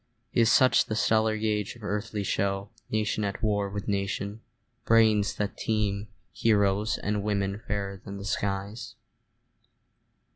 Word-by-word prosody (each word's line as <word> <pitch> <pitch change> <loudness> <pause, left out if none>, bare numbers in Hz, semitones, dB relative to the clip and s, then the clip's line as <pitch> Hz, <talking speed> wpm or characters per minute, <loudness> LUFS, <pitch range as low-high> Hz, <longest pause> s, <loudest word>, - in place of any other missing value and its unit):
Is 115 -1 +4
such 130 0 +5
the 110 - -3
stellar 110 -1 +2
gauge 105 -1 -1
of 115 - -15
earthly 105 0 -2
show, 100 +1 -1 0.2
Nation 110 0 0
at 100 +3 -3
war 105 -2 +1
with 100 0 -5
nation, 100 +1 -2 0.4
brains 110 -3 +4
that 105 -1 -2
teem, 105 -2 -1 0.3
Heroes, 100 0 +2
and 105 0 -1
women 100 0 -1
fairer 100 -2 -3
than 100 -1 -7
the 100 - -7
skies? 100 +1 -3
105 Hz, 135 wpm, -28 LUFS, 100-110 Hz, 0.4 s, such